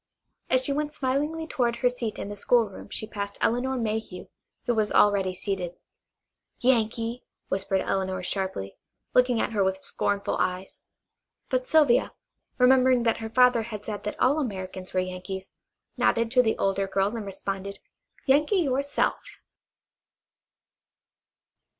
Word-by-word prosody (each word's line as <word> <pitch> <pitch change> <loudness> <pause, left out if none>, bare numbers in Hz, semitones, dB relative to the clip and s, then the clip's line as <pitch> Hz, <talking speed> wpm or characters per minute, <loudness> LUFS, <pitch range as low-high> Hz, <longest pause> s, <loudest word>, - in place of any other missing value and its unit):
As 255 0 +3
she 280 - 0
went 295 +1 -1
smilingly 295 +4 -1
toward 240 -6 0
her 250 +1 +2
seat 235 -3 -4
in - - -5
the 205 - -5
schoolroom 215 0 +1
she - - -4
passed 200 -2 -5
Elinor 255 +3 +1
Mayhew, 220 -5 -3 0.4
who 240 - +2
was 215 -2 +1
already 195 -3 +3
seated. 180 -3 -3 0.8
"Yankee!" 235 -1 +1 0.3
whispered 195 0 0
Elinor 190 -1 -1
sharply, 190 - -3 0.4
looking 250 -2 +4
at - - 0
her 205 -3 +2
with 190 0 -1
scornful 200 0 -1
eyes. 185 +1 -2 0.7
But 255 -1 0
Sylvia, 295 -6 +4 0.4
remembering 255 -1 +5
that 230 -1 +2
her 225 -1 -5
father 250 0 +5
had 215 -2 -7
said 210 -2 -5
that 210 - -4
all 285 +5 +3
Americans 190 -7 -5
were 185 - +1
Yankees, 185 +1 -6 0.5
nodded 230 0 +2
to 250 0 +6
the 220 -3 0
older 195 0 0
girl 195 +3 0
and 225 - -4
responded: 195 0 -4 0.5
"Yankee 300 +8 +3
your 275 -7 +2
self!" 285 +1 0
220 Hz, 140 wpm, -26 LUFS, 195-255 Hz, 0.8 s, to